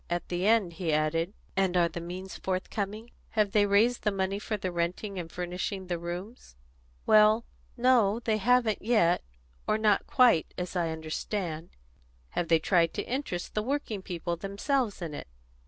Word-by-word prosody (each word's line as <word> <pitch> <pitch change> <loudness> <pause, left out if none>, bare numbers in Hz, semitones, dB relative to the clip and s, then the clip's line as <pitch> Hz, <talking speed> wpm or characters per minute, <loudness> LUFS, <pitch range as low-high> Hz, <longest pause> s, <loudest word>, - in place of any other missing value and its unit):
At 175 0 -2
the 180 +2 0
end 215 -6 +3
he 165 -1 -2
asked: 155 +3 +1 0.3
"And 190 -2 +2
are 170 -1 +4
the 170 +1 -6
means 185 +3 -7
forthcoming? 200 +4 -3 0.3
Have 210 -2 +3
they 205 0 +4
raised 220 +5 +3
the 210 - +1
money 195 0 -1
for 215 0 -3
renting 185 +2 -2
and 165 -2 -6
furnishing 180 +2 -4
the 175 -2 -3
rooms?" 175 - -7 0.5
"Well, 215 +1 +5 0.3
no, 235 -4 +4
they 220 -2 0
haven't 235 0 +2
yet, 200 -7 +3 0.5
or 215 - +2
not 210 -2 +2
quite, 245 - +4
as 180 +1 -4
I 170 -2 +1
understand." 160 +1 -4 0.6
"Have 175 - -2
they 165 0 +5
tried 165 0 +2
to - - -1
interest 245 -9 -4
the 210 - 0
working 235 -4 -2
people 175 -2 -3
themselves 205 - -1
in 160 -3 -5
it? 145 - -7
190 Hz, 165 wpm, -29 LUFS, 175-215 Hz, 0.6 s, Well